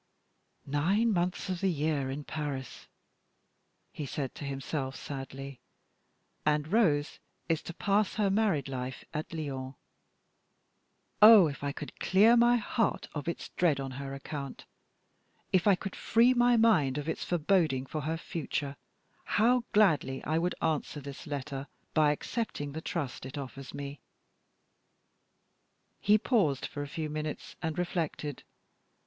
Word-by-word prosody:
"Nine 190 +11 +2
months 180 +1 -1
of 185 -2 -2
the 195 - +3
year 150 -4 0
in 140 +2 -4
Paris," 145 -4 -5 1.1
he 150 - -5
said 135 -1 -3
to - - -8
himself, 135 0 -3
sadly; 135 -1 -7 0.8
"and 150 0 +1
Rose 160 -9 +2 0.3
is 165 -2 +1
to 170 - -7
pass 205 +1 +1
her 205 -2 +2
married 195 -10 +2
life 130 -1 -5
at 155 0 -4
Lyons. 135 -4 -4 1.5
Oh, 210 -3 +10
if 145 -2 -4
I 140 - 0
could 150 +1 -8
clear 210 +6 +5
my 240 0 +5
heart 225 -1 -1
of 145 -1 -5
its 170 - -4
dread 160 -6 +2
on 135 -1 -4
her 135 0 -5
account 140 0 -6 0.9
if 185 +1 +3
I 200 - +7
could 195 +1 -6
free 235 +3 +4
my 245 -1 +4
mind 155 - +4
of 145 +1 -4
its 160 - -2
forebodings 160 -6 +1
for 155 - -2
her 160 +3 -2
future 145 -4 -4 0.6
how 235 +3 +4
gladly 155 -10 +3
I 160 +2 +1
would 175 +2 0
answer 155 -2 -1
this 140 +2 -9
letter 140 -1 -4 0.3
by 155 -2 +4
accepting 150 -3 -3
the 160 +3 -5
trust 145 -6 -4
it 130 +2 -7
offers 135 -1 -7
me!" 140 0 -6 2.0
He 210 +1 +5
paused 200 - +1
for 145 - -5
a 145 - -4
few 155 +2 -4
minutes, 155 0 -5
and 160 -2 -2
reflected. 165 -5 -2
155 Hz, 140 wpm, -30 LUFS, 140-190 Hz, 2.0 s, Oh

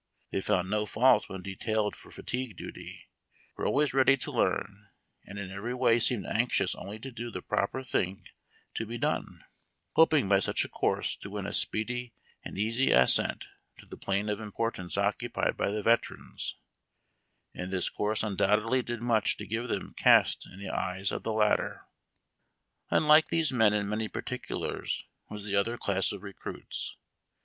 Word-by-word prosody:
They 95 - -1
found 95 -3 +1
no 105 +2 0
fault 125 +6 +4
when 95 -1 -6
detailed 105 +2 -1
for - - -14
fatigue 125 -6 -4
duty, - - -9 0.5
were - - -2
always 145 -1 +2
ready 135 0 +5
to 130 - -5
learn, 100 +1 -1 0.4
and 100 - -8
in 100 -2 -5
every 105 +6 -4
way 125 -2 +4
seemed 120 -2 +1
anxious 110 -5 +1
only 100 +3 -7
to 135 +5 -8
do 120 0 -5
the 90 -5 -6
proper 130 +6 -1
thing 95 -6 -1 0.5
to 110 - -3
be 120 +2 -4
done, - - -2 0.5
hoping 155 -7 +5
by 100 0 +5
such - - 0
a - - -8
course - - 0
to 100 - -8
win 100 -1 -4
a 100 - -4
speedy 120 +2 -1 0.3
and - - -7
easy 115 +6 +1
ascent 65 0 +4 0.3
to - - -14
the - - -9
plane 100 +2 -1
of 105 0 -1
importance 110 -4 -3
occupied - - 0
by - - 0
the 105 +1 -2
veterans; 115 +2 0 1.0
and 90 +1 -5
this 95 -2 0
course 105 +1 -1
undoubtedly 105 +4 +2
did 120 -1 -5
much 115 -3 +2
to - - -6
give 115 +3 -2
them - - -3
caste - - +5
in 95 - -12
the 100 -1 -5
eyes 95 +1 -1
of - - -3
the 115 - -2
latter. 110 -1 +1 1.0
Unlike 155 +1 +6
these 165 -3 +1
men 110 -5 +4
in 100 -1 0
many 110 +1 -1
particulars 125 - -3 0.2
was 105 -1 -7
the 100 -1 -1
other 115 +4 +1
class 95 -3 +1
of 100 -1 -7
recruits. 100 -2 -6
105 Hz, 170 wpm, -30 LUFS, 100-120 Hz, 1.0 s, Unlike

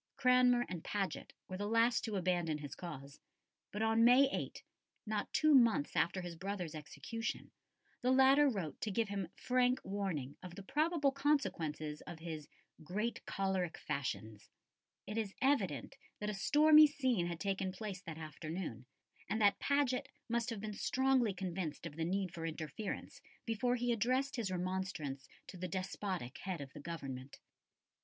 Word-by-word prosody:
Cranmer 250 -2 +5
and 175 -3 -5
Paget 200 -2 -2 0.2
were 185 - -5
the 205 +1 -2
last 230 +2 +3
to 220 -3 -3
abandon 175 -4 +1
his 145 -3 -7
cause, 140 -5 -8 0.5
but 210 +2 -2
on 225 +1 +4
May 250 +4 +7
8 - - -4 0.4
not 215 -1 -2
two 310 -1 +4
months 230 - +4
after 180 +3 +2
his 175 -1 -6
brother's 185 -2 -4
execution 225 +9 -5 0.5
the 250 - +1
latter 265 +2 +6
wrote 190 - -4
to 220 - -1
give 215 +1 0
him 195 -3 -2
frank 250 0 +2
warning 185 -9 -3
of 180 -2 -9
the 200 - -8
probable 300 - +2
consequences 165 - 0
of 170 - -6
his 160 -2 -6 0.4
"great 210 +9 -2
cholerick 190 -3 -1
fashions." 110 -6 -4 0.6
It 210 +2 -2
is 210 -3 -3
evident 195 - +1 0.2
that 210 0 -2
a - - -4
stormy 305 +8 +7
scene 255 -11 +1
had 170 -1 -4
taken 195 -1 -1
place 190 -1 -6
that 165 -4 -7
afternoon, 155 -5 -6 0.4
and 220 - 0
that 205 -2 +4
Paget 280 -3 +1 0.2
must 235 0 0
have 225 -3 -4
been 215 0 -4
strongly 255 -2 +2
convinced 180 -4 -4
of 155 -3 -6
the 165 0 -1
need 185 0 -1
for 165 -2 -4
interference 160 +5 -5 0.2
before 245 +2 +1
he 245 0 0
addressed 255 +5 +1
his 230 -6 -1
remonstrance 180 -7 -3 0.2
to 185 - -10
the 185 +1 -3
despotic 185 -5 -4
head 185 -3 -4
of 140 -1 -8
the - - -9
Government. 140 -4 -6
195 Hz, 160 wpm, -36 LUFS, 165-240 Hz, 0.6 s, May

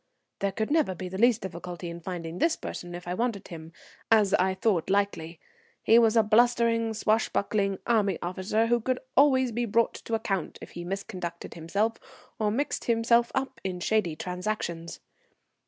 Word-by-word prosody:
There 200 0 0
could 220 +6 -3
never 300 - +2
be 180 +1 -6
the 190 +1 -6
least 235 0 +4
difficulty 175 -1 -6
in 170 0 -6
finding 170 -1 -6
this 330 - +3
person 175 0 -7
if 175 0 -9
I 175 - -1
wanted 225 -1 -2
him, 160 -1 -9 0.4
as 210 -3 +4
I 190 +1 +3
thought 190 -5 0
likely. 190 -5 -1 0.4
He 230 +1 +6
was 230 -1 +4
a 225 - +6
blustering, 230 0 +3
swashbuckling 210 -2 +1
army 205 -6 +2
officer, 190 +5 0
who 240 +1 +2
could 255 +3 0 0.2
always 260 -3 +4
be 240 +2 -1
brought 230 +1 +2
to 230 - -4
account 195 -6 -2
if - - -11
he 175 - -7
misconducted 180 -2 -5
himself, 200 +8 -1 0.4
or 215 -1 +2
mixed 270 +8 -2
himself 235 0 +3
up 265 -2 -3
in 185 -2 -3
shady 180 -4 0
transactions. 180 -2 -4
205 Hz, 170 wpm, -27 LUFS, 180-230 Hz, 0.4 s, He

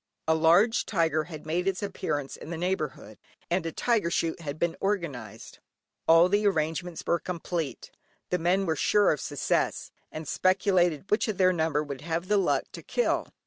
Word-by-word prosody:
A 160 - +4
large 170 +8 +4
tiger 160 -5 +1
had 155 -3 -9
made 175 +4 -1
its 195 +1 -1
appearance 145 -8 -3
in - - -10
the 170 - -4
neighbourhood, 155 - -3 0.3
and 175 0 +1
a - - -3
tiger 220 -2 +1
shoot 165 0 -1
had 145 -2 -5
been 170 +1 0
organised. 140 - -4 0.5
All 165 +2 +7
the 205 +2 +2
arrangements 165 -1 -1
were 170 - +2
complete; 170 -4 -4 0.4
the 180 - +1
men 180 +4 +2
were 160 -3 0
sure 205 +7 +3
of 150 - -2
success, 145 -2 -1 0.2
and 155 -1 -7
speculated 185 -3 +1
which 220 +5 +2
of 215 -4 -2
their 185 -1 +4
number 160 -3 0
would 140 -3 -7
have 170 +3 -3
the 210 - +4
luck 195 - +2
to - - -9
kill. - - 0
170 Hz, 180 wpm, -27 LUFS, 155-185 Hz, 0.5 s, All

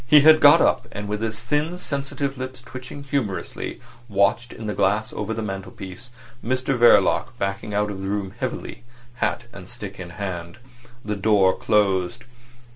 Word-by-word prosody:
He 150 +3 +8
had 155 +1 +8
got 145 +2 +8
up, - - +2
and 105 0 -5
with 105 +1 -3
his 110 -1 -2
thin 150 +8 -1
sensitive 140 -3 -3
lips 130 -1 -6
twitching 130 +3 -9
humorously, 135 -8 -3 0.3
watched 100 +4 +2
in 110 - -8
the 105 - -2
glass 105 +4 +1
over 105 +1 -3
the 110 0 -2
mantelpiece 95 +2 -7 0.3
Mr 130 +2 0
Verloc 120 0 +4
backing 100 +2 -3
out 105 0 +1
of 95 -1 -6
the 95 - -4
room 100 -1 -2
heavily, 130 -2 -4 0.3
hat 120 - -1
and 95 -2 -10
stick 105 -5 -8
in 90 -1 -7
hand. 90 -2 -5 0.5
The 105 0 -1
door 100 -2 +3
closed. 105 +1 +1
105 Hz, 165 wpm, -23 LUFS, 100-130 Hz, 0.5 s, He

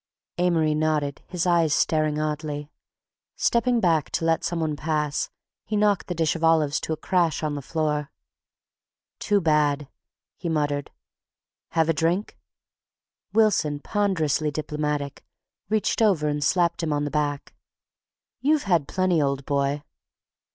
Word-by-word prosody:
Amory 165 -3 +2
nodded, 150 -2 0
his 180 -1 -2
eyes 170 -4 +3
staring 155 -1 +1
oddly. 150 -1 -3 0.6
Stepping 240 0 +2
back 165 -7 +2
to 165 - 0
let 165 0 +2
some 170 0 -1
one 155 -2 -1
pass, 150 -1 -1 0.3
he 215 - -3
knocked 205 -2 +2
the 180 - -3
dish 160 -1 +1
of 165 - -5
olives 155 -3 +3
to - - -4
a - - -4
crash 170 -3 0
on 150 -1 -1
the 145 - -4
floor. 150 0 -1 1.1
"Too 205 -1 +2
bad," 150 -4 +2 0.5
he 175 - -4
muttered. 145 -3 -1 0.8
"Have 160 -1 +3
a 165 - +3
drink?" 170 +6 0 1.0
Wilson, 200 -9 +2
ponderously 160 -6 0
diplomatic, 150 -1 -3 0.5
reached 215 +1 +1
over 185 -9 +3
and 145 0 -1
slapped 175 0 +2
him 160 -2 -1
on 145 0 0
the 145 - -3
back. 145 -2 -2 0.9
"You've 300 +1 +2
had 170 -8 +2
plenty, 185 -4 +1
old 140 -1 -1
boy." 140 0 0
155 Hz, 140 wpm, -25 LUFS, 150-175 Hz, 1.1 s, eyes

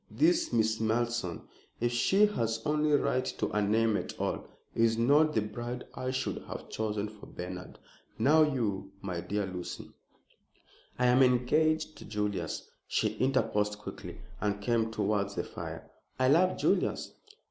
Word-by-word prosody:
This 335 +1 +2
Miss 110 0 +2
Malleson 110 -5 -1 0.4
if 120 +1 +1
she 190 - +4
has 115 - -1
any 150 0 +2
right 130 -2 +2
to - - -3
a 105 - +1
name 110 +2 +2
at - - -4
all - - -2 0.3
is 115 0 +3
not 145 +6 +4
the 110 - +3
bride 120 +3 -5
I 130 - -3
should 130 0 -2
have - - -7
chosen 105 -1 -2
for 105 -1 -12
Bernard. 90 0 -7 0.4
Now 155 +3 +5
you, 105 -10 0
my 90 -3 -3
dear 100 +3 -1
Lucy 90 -1 -6 0.6
" - - -31
"I 125 - +2
am 125 +1 +5
engaged 150 +6 +2
to - - -10
Julius," 105 -2 -3 0.2
she - - +1
interposed 105 -6 +1
quickly, 105 - -8 0.2
and 100 0 -1
came 115 +1 +1
towards 100 -2 0
the - - -1
fire. - - -8 0.3
"I 130 0 +3
love 180 +6 +4
Julius." - - +1
115 Hz, 155 wpm, -30 LUFS, 105-130 Hz, 0.6 s, Now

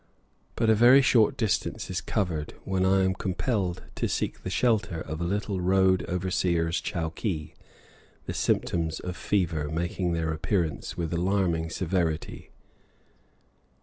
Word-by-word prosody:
But 115 - +1
a 110 - +6
very 125 +5 +7
short 125 +2 +4
distance 110 -6 -1
is - - -2
covered 85 -7 -2
when 95 -1 0
I 95 0 +4
am 95 0 +2
compelled 95 0 -2
to - - 0
seek - - -2
the - - -5
shelter 100 -4 +1
of 80 +1 -5
a - - 0
little 100 +1 -1
road 95 0 +3
overseer's 90 -2 0
chowkee, 80 0 -3 0.7
the - - -4
symptoms 80 -2 0
of 90 0 -5
fever 85 -8 -1
making 85 +2 -1
their 80 -1 -1
appearance 85 -1 -2
with 85 -1 -2
alarming 85 -2 +1
severity. 85 -2 -2
90 Hz, 135 wpm, -27 LUFS, 80-100 Hz, 0.7 s, very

